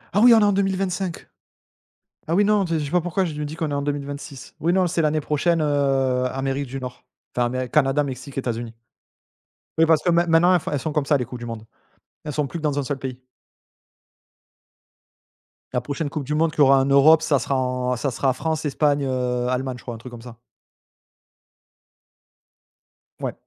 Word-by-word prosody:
Ah 205 - +4
oui, 245 +1 +8
on - - +6
est - - +4
en 205 -1 +3
2025. 190 -2 -2 1.0
Ah 165 - -1
oui. 205 +2 +4
Non, 210 -1 +3
j 165 -2 -1
je 150 - -3
sais 140 - -7
pas 180 - +3
pourquoi 180 +3 -1
je 165 - -4
me 150 0 -4
dis 150 +2 -6
qu'on 160 -3 -2
est - - -2
en 140 - -1
2026. 140 -1 -6
Oui 170 - +2
non 185 0 +2
c'est 165 0 0
l'année 155 0 +1
prochaine, 155 +3 0
heu, 135 -3 +1
Amérique 135 +2 -3
du 135 +2 -6
Nord, 125 -1 -8 0.3
enfin 120 -1 +2
Amé 130 +1 -3
Canada, 145 0 +2
Mexique, 135 +1 -7
États-Unis. 120 -3 -3 1.1
Oui 165 - +5
parce 160 -2 +3
que 180 - +2
main 170 0 +3
maintenant 170 +2 +4
elles 180 - +3
font - - -5
elles 145 - +1
sont 155 - -3
comme 150 -2 0
ça 145 - +3
les 125 - -1
coupes 125 +1 -8
du 120 - -7
monde. 115 -2 -7 0.6
Elles 150 - -4
sont 150 0 -1
plus 155 +6 -6
que - - -13
dans 145 -1 0
un 145 - -1
seul 140 +1 -3
pays. 130 -1 -6 2.5
La 125 - -1
prochaine 145 +4 -3
coupe 150 0 -4
du 150 +3 -2
monde 160 +1 +2
qu'il 155 - -10
y - - +6
aura 135 -1 +6
en - - +1
Europe 140 +4 +6
ça 145 -3 +2
sera 140 - -2
en 125 -1 -1
ça 135 +3 -2
sera 130 +2 0
France, 155 +4 -3
Espagne, 145 0 +1
heu, 125 -1 -1
Allemagne 130 0 -2
je - - -15
crois, 120 - -6
un - - -9
truc 120 +3 -11
comme 120 -1 -10
ça. 120 -1 -11 2.8
Ouais. - - -3
145 Hz, 215 wpm, -23 LUFS, 130-160 Hz, 2.8 s, oui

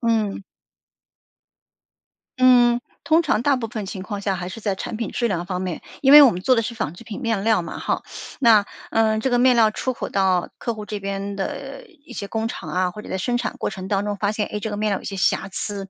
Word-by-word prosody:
嗯。 220 -4 0 2.0
嗯， 245 -2 +5 0.2
通 320 +3 +4
常 235 -8 +1
大 280 0 +3
部 240 -3 -3
分 220 -2 -5
情 190 0 -6
况 205 +1 -5
下， 195 -1 -1
还 175 0 -5
是 225 - -8
在 205 -2 -1
产 205 +3 -5
品 230 - -3
质 235 -1 0
量 175 -3 -2
方 180 -1 -3
面。 180 -3 -4 0.2
因 270 0 +5
为 295 0 +12
我 270 - +8
们 180 - -4
做 255 +7 +3
的 230 - +2
是 235 +2 -4
纺 220 -9 -3
织 205 - -13
品 215 -2 -7
面 225 -5 -1
料 220 -3 +3
嘛， 165 - -7
哈。 - - -2 0.4
那 225 -6 +5 0.3
呃， 220 -1 +2
这 260 +4 -1
个 245 - +3
面 250 0 +5
料 220 -2 +5
出 255 +4 -2
口 - - -5
到 190 -2 +1
客 235 - -3
户 210 -1 -8
这 210 -1 -5
边 200 0 -4
的， 275 - -5
一 315 - -17
些 200 -4 -6
工 225 +1 -2
厂 170 -8 -7
啊， 180 +3 0
或 210 +4 -9
者 - - -11
在 190 - -2
生 240 +6 0
产 240 -3 -3
过 - - -1
程 190 -1 -7
当 200 0 0
中 205 -1 -2
发 205 +1 0
现 210 -1 -1
哎， 210 - -4
这 220 - -4
个 205 - -4
面 215 +1 0
料 195 - 0
有 - - -15
些 195 - -5
瑕 190 0 +1
疵、 195 0 -5
215 Hz, 270 characters per minute, -22 LUFS, 195-240 Hz, 2.0 s, 为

